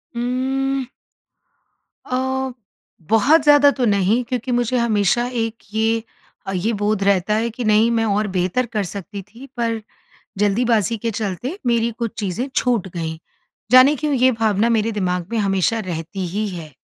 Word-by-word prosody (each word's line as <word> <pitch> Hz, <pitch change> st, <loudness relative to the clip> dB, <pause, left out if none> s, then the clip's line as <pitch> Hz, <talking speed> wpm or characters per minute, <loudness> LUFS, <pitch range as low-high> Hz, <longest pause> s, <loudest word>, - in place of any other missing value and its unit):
उम्म। 260 Hz, +2 st, -1 dB, 1.2 s
अ, 260 Hz, 0 st, -2 dB, 0.6 s
बहुत 275 Hz, +9 st, +5 dB
ज़्यादा 290 Hz, -1 st, +6 dB
तो 255 Hz, -3 st, -1 dB
नहीं 205 Hz, +3 st, +2 dB
क्योंकि 250 Hz, +1 st, -3 dB
मुझे 245 Hz, +1 st, +1 dB
हमेशा 230 Hz, 0 st, +2 dB
एक 225 Hz, -2 st, -3 dB, 0.2 s
ये 225 Hz, +1 st, +1 dB, 0.4 s
अ, 195 Hz, -, -4 dB
ये 190 Hz, +5 st, 0 dB
बोध 205 Hz, 0 st, 0 dB
रहता 200 Hz, +1 st, +2 dB
है 230 Hz, +2 st, 0 dB
कि 240 Hz, +2 st, -6 dB
नहीं 215 Hz, +1 st, +4 dB
मैं 225 Hz, -1 st, +1 dB
और 210 Hz, 0 st, 0 dB
बेहतर 185 Hz, +8 st, 0 dB
कर 215 Hz, -3 st, -2 dB
सकती 200 Hz, +2 st, -7 dB
थी 230 Hz, +7 st, -14 dB
पर, 230 Hz, -2 st, -1 dB, 0.6 s
ज़ल्दीबाज़ी 220 Hz, +2 st, +2 dB
के 230 Hz, +2 st, -2 dB
चलते 225 Hz, -, -4 dB
मेरी 235 Hz, -1 st, +2 dB
कुछ 235 Hz, -2 st, -2 dB
चीज़ें 215 Hz, +6 st, -2 dB
छूट 235 Hz, -7 st, +1 dB
गई। 160 Hz, -1 st, -4 dB, 0.5 s
ज़ाने 260 Hz, +4 st, +8 dB
क्यों 300 Hz, +1 st, -2 dB
ये 260 Hz, 0 st, +4 dB
भावना 220 Hz, 0 st, +1 dB
मेरे 225 Hz, 0 st, +1 dB
दिमाग 180 Hz, -4 st, -1 dB
में 230 Hz, -, 0 dB
हमेशा 195 Hz, +1 st, +1 dB
रहती 180 Hz, 0 st, -5 dB
ही 210 Hz, +5 st, -2 dB
है। 165 Hz, -5 st, -8 dB
225 Hz, 155 wpm, -20 LUFS, 200-245 Hz, 1.2 s, ज़ाने